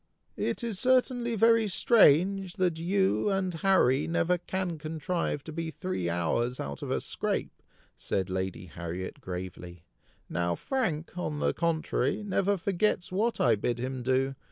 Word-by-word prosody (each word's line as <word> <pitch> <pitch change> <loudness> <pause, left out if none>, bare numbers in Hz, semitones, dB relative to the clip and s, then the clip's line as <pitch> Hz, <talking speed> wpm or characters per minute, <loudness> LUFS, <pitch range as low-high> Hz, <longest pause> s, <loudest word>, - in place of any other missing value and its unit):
"It - - -2
is 225 -5 -1
certainly 250 -2 +2
very 230 0 +4
strange, 190 - +4
that 175 -3 0
you 190 +4 +1
and 190 -2 0
Harry 165 -6 +3
never 175 +1 +1
can 180 -2 -3
contrive 160 -1 -2
to 160 - -8
be 165 +1 -3
three 160 - -3
hours 85 +9 0
out 70 -1 -5
of - - -5
a - - +1
scrape!" - - -3 0.4
said 95 -2 -1
Lady 95 0 -3
Harriet 85 +3 -6
gravely; 90 -1 -7 0.4
"now 85 0 -1
Frank, 175 - -2
on 150 -4 -2
the - - +1
contrary, 160 0 0
never 200 0 +1
forgets 190 0 0
what 220 +5 0
I 120 - +4
bid 115 +3 -1
him 130 +1 -4
do. 130 +2 +1
165 Hz, 150 wpm, -29 LUFS, 120-195 Hz, 0.4 s, very